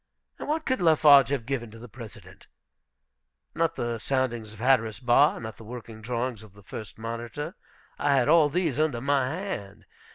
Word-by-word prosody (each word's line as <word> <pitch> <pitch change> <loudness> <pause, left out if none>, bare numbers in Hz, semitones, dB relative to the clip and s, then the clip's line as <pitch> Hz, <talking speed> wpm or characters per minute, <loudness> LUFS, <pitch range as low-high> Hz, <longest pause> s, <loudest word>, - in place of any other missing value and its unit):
What 310 +1 -2
could 260 -6 0
Lafarge 150 -5 +6
have 135 -5 -2
given 120 -3 -3
to 115 - -13
the 120 +2 -10
President? 115 -1 -12 1.1
Not 165 0 0
the 120 -1 -3
soundings 120 -4 -1
of 110 - -13
Hatteras 115 -3 +2
Bar. 125 +4 +4
Not 110 -2 -7
the - - -12
working 115 -1 -9
drawings 120 0 -3
of 110 -3 -15
the 100 0 -17
first 110 +2 -9
monitor. 115 +8 -5 0.5
I 140 -1 +3
had 130 -1 +2
all 155 -1 +5
these 160 -4 -1
under 155 -6 +1
my 135 0 +1
hand. 110 - -6
125 Hz, 170 wpm, -27 LUFS, 115-145 Hz, 1.1 s, Lafarge